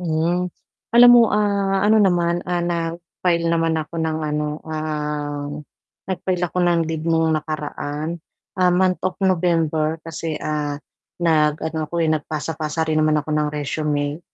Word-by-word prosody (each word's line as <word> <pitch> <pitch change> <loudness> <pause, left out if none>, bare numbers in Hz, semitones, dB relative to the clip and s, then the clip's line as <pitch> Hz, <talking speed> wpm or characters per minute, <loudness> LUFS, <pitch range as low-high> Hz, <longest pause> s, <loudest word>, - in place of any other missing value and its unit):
Mhm. 175 +2 0 0.5
Alam 245 0 +9
mo, 240 -1 +8
ah, 200 -2 +1
ano 215 +1 +5
naman, 175 -3 +2
ah, 175 -1 0
nag-file 170 0 -1
naman 165 -1 +1
ako 160 +1 -5
ng 160 -1 -1
ano, 150 0 -1 0.2
um, 150 -2 -3 0.6
nag-file 185 -1 -1
ako 180 - -4
ng 175 -1 +3
leave 160 -1 -3
nung 165 -1 +2
nakaraan. 155 +1 -3 0.4
Ah, 180 -1 +3
month 185 0 +2
of 185 -1 -1
November 165 -4 +1
kasi, 165 -1 -4
ah, 150 -1 -2 0.4
nag-ano 155 -1 +1
ako, 170 - -10
eh, - - +1
nagpasa-pasa 155 +1 -2
rin 155 0 +2
naman 155 0 +3
ako 150 - -8
ng 150 0 +1
resume. 145 0 -2
160 Hz, 140 wpm, -21 LUFS, 155-175 Hz, 0.6 s, Alam